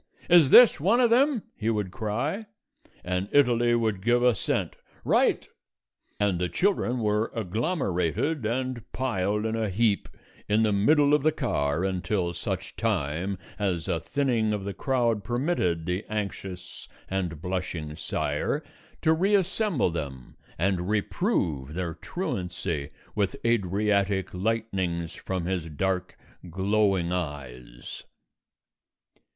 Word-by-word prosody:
"Is 170 -6 +7
this 240 - +8
one 200 - +3
of 240 -2 +4
them?" 265 -1 +3
he 110 - -1
would 105 -4 -1
cry, 125 - -2 0.6
and 90 +2 -2
Italy 120 -4 +4
would 110 -5 0
give 120 +3 +2
assent. 125 -4 +1 0.3
"Right!" - - +2 0.7
And 100 -4 +1
the 90 -1 0
children 125 - +1
were 105 +1 +1
agglomerated 115 - -1
and 125 +1 -2
piled 105 -4 -1
in 110 0 -1
a 110 -2 -1
heap 105 +1 +1 0.4
in 105 +2 +3
the 110 - +2
middle 145 +9 +4
of 150 - +4
the 155 +3 +3
car 75 - -1
until 95 -1 -1
such 85 - -4
time 85 +7 -1 0.2
as 95 -5 -1
a 85 -4 0
thinning 115 - 0
of 105 -2 -3
the 100 0 -4
crowd 120 -2 0
permitted 120 - 0
the 90 +3 -2
anxious 95 -3 -5 0.2
and 90 -5 -2
blushing 90 -4 -4
sire 75 - -2 0.4
to 160 - +5
reassemble 195 - +2
them 70 -6 -6 0.2
and 90 +1 0
reprove 90 - -1
their 90 -2 -2
truancy 90 -5 -4 0.2
with 100 -2 0
Adriatic 100 -2 +1
lightnings 95 -5 -1
from 95 -3 -4
his 90 -3 -2
dark 90 +4 -2 0.3
glowing 95 -1 +1
eyes. 65 -8 -6
100 Hz, 125 wpm, -27 LUFS, 90-120 Hz, 0.7 s, this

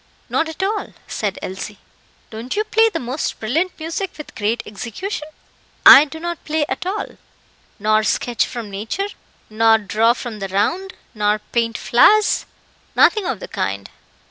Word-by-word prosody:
"Not 320 - 0
at 320 +4 -4
all," 415 +2 -2
said 205 -3 -3
Elsie. 190 +2 -6 0.5
"Don't 230 +3 -5
you 425 - +1
play 450 +1 +3
the - - -3
most 255 +4 -3
brilliant 320 +13 -1
music 330 +4 -3
with 300 - -9
great 220 +2 -1
execution?" 275 - -5 0.6
"I 285 - +11
do 320 +2 -9
not 345 0 -5
play 305 -1 0
at - - -4
all." 400 +3 -4 0.6
"Nor 215 +1 +3
sketch 235 +2 0
from 230 -4 -6
nature 220 - -3 0.4
nor 225 +1 +4
draw 220 +3 +2
from 240 -3 -7
the 195 - -3
round 330 - -1 0.2
nor 210 -1 +1
paint 230 +2 -2
flowers?" 420 - +4 0.5
"Nothing 425 -4 +4
of 245 - -2
the - - -7
kind." 95 +1 -3
240 Hz, 155 wpm, -20 LUFS, 215-345 Hz, 0.6 s, I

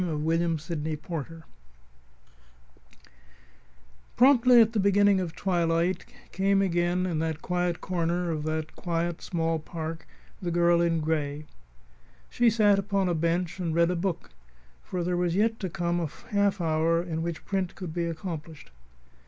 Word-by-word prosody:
VII - - -2
WHILE 165 +2 0
THE 155 -1 -4
AUTO - - -8
WAITS 165 0 -5 2.7
Promptly 250 -1 +6
at 225 0 +5
the 220 - +1
beginning 200 0 +4
of 175 -3 -4
twilight, 170 -1 0 0.2
came 195 +1 +2
again 175 0 +1
to 185 -2 -1
that 160 0 -2
quiet 180 -1 -1
corner 175 0 -1
of 155 -2 -2
that 155 0 -3
quiet, 170 -1 -2
small 165 -2 -1
park 160 0 -6 0.3
the 180 - -2
girl 170 0 +3
in 165 -1 +1
gray. 150 -1 -2 0.9
She 240 -1 +4
sat 205 -3 +4
upon 195 -1 0
a - - +1
bench 170 +2 -1
and 165 -3 -2
read 170 +1 +3
a - - -1
book, 175 -1 -3 0.5
for 180 - -4
there 180 0 -1
was 175 -1 0
yet 225 +3 +1
to 190 - -3
come 175 +1 -1
a 165 - -1 0.2
half 200 -1 +2
hour 165 0 +1
in 165 -2 -4
which 170 -1 -4
print 190 -3 -2
could 180 -4 -6
be 170 0 -1
accomplished. 160 - -6
170 Hz, 155 wpm, -27 LUFS, 165-185 Hz, 2.7 s, Promptly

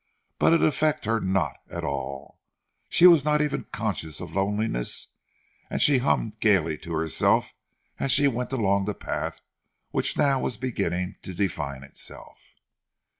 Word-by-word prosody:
But - - +5
it 165 - +3
affected 155 -2 +1
her 115 0 +2
not 95 -2 0
at - - -5
all, 70 0 -5 0.5
she 175 - +5
was 170 -5 +8
not 150 0 +2
even 150 -1 -1
conscious 90 - -3
of - - -7
loneliness, 100 - -1 0.6
and - - -2
she 140 -3 +5
hummed 110 -4 0
gaily 90 -8 +3
to 85 - -7
herself 80 0 +1 0.5
as 135 - 0
she 140 +2 +5
went 125 -1 -2
along 100 -6 +1
the 105 -1 -2
path - - -4 0.5
which - - 0
now 135 -2 +3
was 120 - -2
beginning 90 -7 -2
to 95 - -8
define 75 -8 -2
itself. 70 - -11
105 Hz, 150 wpm, -26 LUFS, 85-135 Hz, 0.6 s, was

